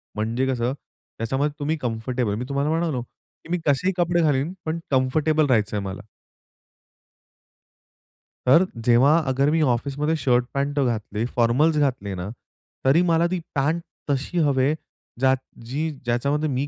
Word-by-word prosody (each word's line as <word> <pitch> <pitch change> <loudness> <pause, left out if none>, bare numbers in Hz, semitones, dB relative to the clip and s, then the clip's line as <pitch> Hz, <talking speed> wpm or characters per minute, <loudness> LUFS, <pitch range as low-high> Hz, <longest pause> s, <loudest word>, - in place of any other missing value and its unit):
म्हणजे 115 +5 -1
कसं 125 -1 0
त्याच्यामध्ये 140 +1 -4
तुम्ही 155 +2 -1
कम्फर्टेबल 120 -3 -2
मी 125 +4 -4
तुम्हाला 140 +2 0
म्हणालो 160 -5 0
की 125 - -19
मी 180 - +2
कसेही 165 +7 +2
कपडे 175 -1 +2
घालीन 150 +2 +1
पण 160 +1 -2
कम्फर्टेबल 150 +4 +2
राहायचंय 105 -5 +1
मला. 95 0 -5 2.5
तर 165 +9 +6 0.2
जेव्हा 135 +7 +6
अगर 135 +2 +2
मी 160 0 +2
ऑफिसमध्ये 145 +4 0
शर्ट-पॅन्ट 140 +2 0
अ, - - +3
घातले, 110 -2 -2
फॉर्मल्स 130 +7 +3
घातले 125 -9 0
ना, 90 +3 -5 0.6
तरी 140 +6 +5
मला 165 +1 +3
ती 185 - 0 0.2
पॅन्ट 155 +5 +1 0.3
तशी 140 +6 -1
हवे 135 +1 +2 0.5
ज्यात 130 0 +4 0.3
जी 155 +5 -1 0.2
ज्याच्यामध्ये 140 +6 0
मी 135 +2 -1
135 Hz, 135 wpm, -23 LUFS, 120-155 Hz, 2.5 s, तर